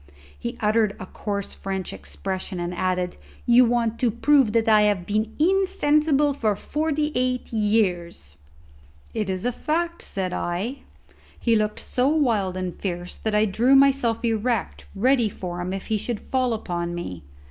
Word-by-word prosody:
He - - -5
uttered 215 -1 +2
a - - -6
coarse 200 +1 -4
French 190 -2 -4
expression 190 -1 -5
and 175 +1 -3
added, 180 0 -1 0.3
"You 245 +1 +6
want 230 -1 0
to 245 - +3
prove 255 +1 +3
that 225 -1 +2
I 215 -1 +6
have 205 -4 +2
been 215 +3 -1
insensible 305 -5 +2
for 220 -6 0
forty 300 +5 -1
eight 250 -1 -1
years." 185 - 0 0.8
"It 215 -3 -2
is 185 -1 -2
the 245 - +1
fact," 335 +6 -2
said 185 -2 -3
I. 195 +10 -2 0.6
He 230 -2 +2
looked 215 -1 0
so 255 +1 0
wild 230 -12 +1
and 185 -1 -3
fierce 175 -2 -4
that 220 -1 -2
I 210 +1 +4
drew 235 +7 +3
myself 270 -4 +3
erect 225 0 -1
ready 240 +2 +3
for 180 -2 -6
him 180 +1 -3
if 195 0 -4
he 220 - 0
should 235 0 -3
fall 255 -2 0
upon 175 -4 -3
me. 90 - -6
220 Hz, 160 wpm, -24 LUFS, 190-255 Hz, 0.8 s, You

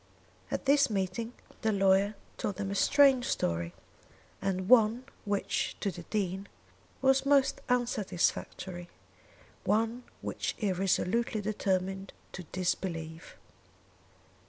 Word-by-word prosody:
At - - -3
this 280 0 +5
meeting 205 +3 -2 0.3
the 220 - +2
lawyer 195 +1 +3 0.2
told 200 - -2
them 195 0 -3
a - - -1
strange 270 +3 +5
story, 85 0 -1 0.7
and 185 -1 -1
one 230 +1 +5 0.2
which 205 -1 -1
to 200 - -1
the 175 - -8
Dean 195 -2 -2 0.6
was 265 0 +4
most 275 -1 +3
unsatisfactory, 190 -6 -1 0.7
one 225 +3 +1 0.2
which - - -3
he 205 -3 0
resolutely 195 +4 +1
determined 195 -2 -1 0.2
to 185 - -7
disbelieve. 165 -2 -3
200 Hz, 110 wpm, -30 LUFS, 185-235 Hz, 0.7 s, this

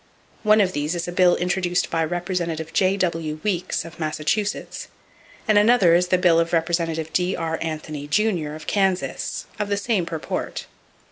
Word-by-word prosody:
One 215 -1 +5
of 185 -2 +1
these 150 +4 -1
is 170 - -3
a - - -3
bill 180 0 +4
introduced 180 0 0
by 165 -1 +1
Representative 170 -1 -3
J.W. 170 -5 0
Weeks, 185 -5 -1
of 165 0 -11
Massachusetts, 160 +7 -2 0.6
and 215 -1 +5
another 210 -5 +5
is 180 +1 +3
the 185 - +3
bill 175 -2 +4
of 165 0 0
Representative 165 -1 0
D.R. 165 -3 -1
Anthony, 155 -2 -5
Jr., 170 -4 0
of 155 - -10
Kansas, 190 -2 -1
of 210 -1 -2
the 200 - +1
same 200 -4 0
purport. 160 -2 -4
175 Hz, 155 wpm, -23 LUFS, 160-190 Hz, 0.6 s, One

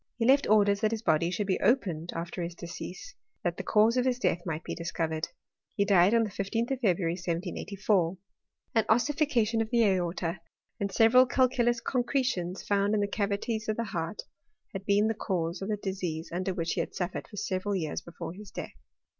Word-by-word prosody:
He 230 - 0
left 275 +3 +4
orders 205 -1 +4
that 215 - +3
his 225 0 -3
body 165 -3 +2
should 185 +4 -1
be 190 -1 0
opened 175 - +1
after 170 +2 -4
his 170 0 -4
de 170 - -8
cease, 180 - -8 0.3
that 175 -1 -1
the - - -3
cause 220 +3 +3
of 250 - +2
his 255 -1 +1
death 175 -8 0
might 160 0 -3
be - - -4
discovered. 165 -1 -2 0.5
He 200 - +2
died 195 +1 +5
on 230 - +4
the 210 - -3
15th 225 +6 -2
of 265 - -1
February, 180 -7 +1
1784. 180 +1 -1 0.6
An 225 - +4
ossifi 285 +6 +2
cation 230 -3 +2
of 220 - -2
the 235 -1 +3
aorta, 175 -2 0 0.4
and 200 -1 -1
several 240 +5 +6
calculous 240 -2 +2
concretions 245 -8 -1
found 200 +1 +2
in - - +2
the 205 - +1
cavities 210 +2 -2
of 215 - 0
the 230 - 0
heart, 175 -2 -4 0.5
had 195 0 -6
been 205 +1 +4
the 225 - +1
cause 175 -5 -2
of 195 - -4
the 210 - 0
disease 185 -5 -4
under 185 +2 -1
which 170 -3 -2
he - - -2
had - - -3
suffered 180 0 -3
for 205 - -12
several 190 +2 -1
years 160 -5 -2
before 170 -1 -7
his 205 +1 -11
death. - - -7
200 Hz, 205 wpm, -29 LUFS, 175-225 Hz, 0.6 s, several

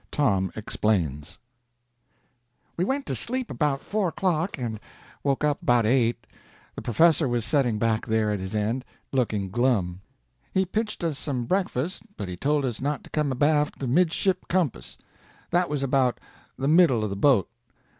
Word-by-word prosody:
TOM 100 -10 +1
EXPLAINS 90 -7 -1 1.4
We 175 - 0
went 270 +7 -1
to - - -2
sleep 255 0 -1
about 145 -3 0
four 205 -2 -1
o'clock, 175 0 -1
and 115 -4 -4 0.4
woke 140 0 0
up 150 -1 +1
about 120 -2 +3
eight. 120 0 +2 0.5
The - - -7
professor 160 +5 +3
was 120 -2 -1
setting 120 -3 +1
back 115 0 0
there 110 -1 +1
at 105 - -1
his 95 +3 -5
end, 110 +5 -1 0.3
looking 110 -7 0
glum. 105 -7 +1 0.5
He 190 0 +3
pitched 210 +1 -3
us 155 -4 -1
some 130 -5 -2
breakfast, 180 -1 -1 0.2
but 100 - -4
he 90 - -4
told 145 +8 +1
us 120 -4 -3
not 145 0 -2
to - - -15
come 150 -3 0
abaft 150 +3 +2
the 135 - -4
midship 180 +6 +1
compass. 160 - -1 0.5
That 175 0 +2
was 145 -2 -1
about 130 -2 +2 0.4
the 135 - -1
middle 155 -8 +5
of 105 - -2
the - - -2
boat. 105 -2 +3
135 Hz, 165 wpm, -26 LUFS, 110-160 Hz, 1.4 s, middle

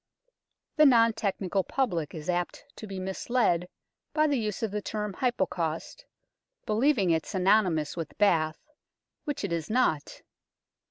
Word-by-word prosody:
The 305 - +7
non 230 -3 +5
technical 195 -3 -1
public 175 - -1
is 155 -1 -7
apt 175 +8 -2
to 215 - -8
be 195 -1 -6
misled 185 -1 0 0.5
by 310 0 +4
the 285 -4 +1
use 215 -1 -3
of 220 - -1
the 210 0 -2
term 210 -1 -4
Hypocaust, 190 - -2 0.6
believing 220 - +2
it 160 -1 +2
synonomous 185 -6 +2
with 165 -3 -6
bath, 160 - +1 0.6
which 290 -7 -3
it 195 -4 -2
is 165 -2 -3
not. 215 - 0
195 Hz, 140 wpm, -28 LUFS, 170-230 Hz, 0.6 s, The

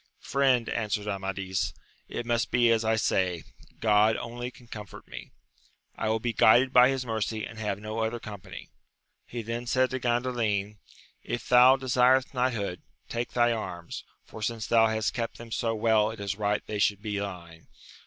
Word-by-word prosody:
Friend, 130 -4 +1
answered 105 -2 -2
Amadis, 95 -3 -2 0.3
it 120 - -4
must 120 0 0
be 120 -2 +4
as 115 0 +2
I 110 0 +2
say; 90 -5 0 0.4
Grod 110 0 +4
only 120 +1 -5
can 125 -1 -17
comfort 105 -3 -10
me! - - -9 0.7
I 110 - -2
will 110 +1 +1
be 120 +1 -2
guided 120 +5 +5
by 125 +1 +7
his 135 -1 -2
mercy, 110 -1 -2
and 115 - -10
have 105 -2 -2
no 110 +1 -5
other 115 +1 -1
company. 105 -4 -9 0.6
He 120 -1 -5
then 115 +2 -4
said 130 +1 +2
to 130 - -2
Gandalin, 120 -5 -1 0.4
if 120 - -5
thou 125 +1 +7
desirest 130 0 +3
knighthood, 120 -8 -1 0.3
take 120 +1 -4
my 120 -1 +4
arms; 90 -6 -6 0.2
for, 110 - -11
since 115 -1 -2
thou 115 -1 +4
bast 110 0 -1
kept 115 -2 -3
them 115 -1 -11
so 115 0 -1
well, 110 -1 +3
it 110 0 -8
is 100 0 -3
right 105 0 0
they 105 - -4
should 105 0 +1
be 105 -2 -2
thine. 85 -5 -7
110 Hz, 175 wpm, -28 LUFS, 105-120 Hz, 0.7 s, by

